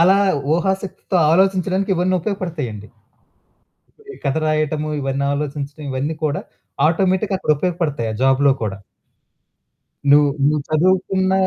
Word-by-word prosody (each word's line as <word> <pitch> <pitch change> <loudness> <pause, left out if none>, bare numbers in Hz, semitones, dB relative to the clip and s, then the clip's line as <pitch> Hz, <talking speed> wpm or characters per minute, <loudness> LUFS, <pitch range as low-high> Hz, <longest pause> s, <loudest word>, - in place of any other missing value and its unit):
అలా 185 +3 +6 0.4
ఊహాశక్తితో 190 +1 -2
ఆలోచించడానికి 190 +2 +2
ఇవన్నీ 180 +1 +1
ఉపయోగపడతాయండి. 160 - -4 1.3
ఈ - - -11
కథ 135 - +1
రాయటము, 155 0 0
ఇవన్నీ 135 +1 -1
ఆలోచించడం 145 +1 -4
ఇవన్నీ 140 +5 -2
కూడా 145 -1 -1 0.5
ఆటోమేటిక్‌గా 190 +3 +1
అక్కడ 170 - +1
ఉపయోగపడతాయి. 150 -8 -1
ఆ - - -5
జాబ్‌లో 135 +1 +4
కూడా. 100 -2 -3 1.3
నువ్వు 145 0 +6 0.2
నువ్వు 150 0 +1
చదువుకున్న 185 +3 +2
155 Hz, 110 wpm, -20 LUFS, 140-185 Hz, 1.3 s, అలా